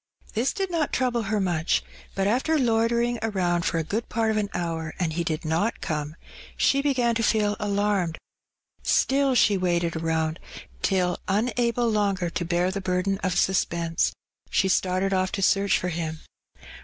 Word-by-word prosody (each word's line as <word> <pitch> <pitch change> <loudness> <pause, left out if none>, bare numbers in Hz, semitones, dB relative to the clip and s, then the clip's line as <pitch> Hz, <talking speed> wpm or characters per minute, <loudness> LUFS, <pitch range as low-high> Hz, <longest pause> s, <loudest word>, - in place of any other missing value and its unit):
This 235 +4 +1
did 390 -3 -3
not 325 -4 0
trouble 245 -2 +1
her 215 -1 +1
much, 175 -4 +1 0.3
but 195 - 0
after 260 +10 +2
loitering 235 -1 +1
around 180 -6 0
for - - 0
a 165 - 0
g^od 215 +8 -3
part 225 -1 +1
of 215 - 0
an 205 -1 0
hour, 165 -2 -3
and 170 -4 -1
he 170 +1 -1
did 160 -1 -3
not 165 +9 0
come, 150 -1 -3 0.4
she 275 - +3
began 255 -5 +1
to 230 - -1
feel 210 -2 +2
alarmed; 200 -4 0 0.6
still 270 -1 +2
she 210 -4 +4
waited 175 -2 0
around, 160 0 -1 0.4
till, 180 -2 +1
unable 235 +3 +1
longer 200 -5 0
to 175 - -2
bear 175 +2 +1
the 200 +1 -4
burden 190 +1 0
of 185 -3 -1
suspense, 170 -3 +1 0.4
she 190 - +2
started 185 +1 +1
oflF 185 -1 +1
to 195 - -1
search 200 +1 +3
for 180 - -2
him. 160 -2 -3
195 Hz, 170 wpm, -25 LUFS, 175-230 Hz, 0.6 s, she